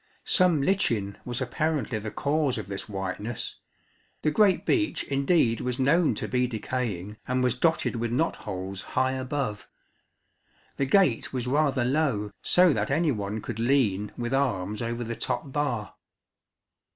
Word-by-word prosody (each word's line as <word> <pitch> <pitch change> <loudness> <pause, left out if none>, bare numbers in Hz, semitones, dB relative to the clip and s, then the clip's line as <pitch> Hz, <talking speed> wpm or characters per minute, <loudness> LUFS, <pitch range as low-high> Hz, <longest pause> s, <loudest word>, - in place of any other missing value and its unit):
Some 175 -7 +3
lichen 115 - +1
was 120 +1 -3
apparently 130 -2 -1
the 110 +1 -5
cause 145 +1 0
of 110 - -5
this 100 +2 -5
whiteness: 100 +3 -4 0.6
the 155 - +2
great 195 +2 +3
beech 320 -4 +1
indeed 140 -4 +2
was 125 -1 -2
known 150 +5 +3
to - - -4
be 125 -1 +1
decaying 110 -4 -3
and 125 0 +1
was 125 -2 +3
dotted 160 +1 +1
with 115 0 -2
knot 155 +7 +1
holes 95 -1 -5 0.2
high 130 0 +3
above. 130 -4 -3 1.1
The 135 - 0
gate 185 - +3
was 125 -2 -2
rather 140 -1 +2
low, 125 -7 0
so 180 -3 +5
that - - -1
any 155 +3 +2
one 105 -2 -3
could 115 0 -6
lean 115 -5 +2
with 120 +1 -3
arms 105 -7 0
over 120 +1 -2
the 115 0 -4
top 140 - -3
bar. 130 -7 -2
125 Hz, 150 wpm, -27 LUFS, 110-145 Hz, 1.1 s, so